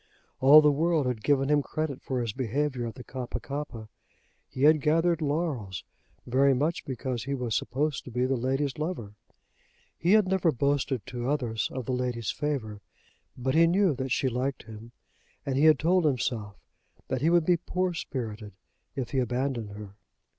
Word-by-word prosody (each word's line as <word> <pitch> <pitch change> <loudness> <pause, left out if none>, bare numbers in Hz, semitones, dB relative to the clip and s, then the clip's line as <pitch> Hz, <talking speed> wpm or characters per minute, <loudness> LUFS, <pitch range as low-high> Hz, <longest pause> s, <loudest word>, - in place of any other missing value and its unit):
All 145 +4 +9
the 150 -1 +5
world 160 0 +1
had 125 -4 -2
given 135 -2 +2
him 150 -1 +4
credit 150 -1 -4
for 130 -2 -2
his 115 -3 -3
behaviour 130 0 -1
at 115 - -7
the 125 - -9
Kappa 125 -1 -5
kappa. 135 -4 -6 0.6
He 130 - -4
had 155 0 +6
gathered 165 +2 +2
laurels, 145 - -2 0.4
very 135 +2 +3
much 155 +6 -1
because 130 -3 -4
he 140 +1 -2
was 125 -4 -3
supposed 145 +1 -1
to - - -8
be 125 +1 0
the 135 +1 +1
lady's 135 +3 -1
lover. 150 - -4 0.8
He 175 +4 +2
had 215 -3 +5
never 185 -3 +2
boasted 140 -3 0
to 120 +1 -4
others 120 -7 -1
of 130 -2 -5
the - - -2
lady's 125 -3 -2
favour; 115 -9 -3 0.6
but 130 +1 -1
he 165 +2 +5
knew 185 0 +3
that 130 -1 -4
she 135 - +1
liked 130 +2 -2
him, 110 +1 -11 0.5
and 135 -2 -1
he 140 +3 +3
had 155 -1 +7
told 180 +3 +2
himself 120 -7 -1 0.5
that - - -2
he 160 - +3
would 170 -2 +3
be 175 0 +4
poor 180 +1 -2
spirited 110 - -5 0.4
if 130 -3 -4
he 135 - +1
abandoned 125 -2 -1
her. 100 -1 -10
135 Hz, 180 wpm, -28 LUFS, 120-150 Hz, 0.8 s, All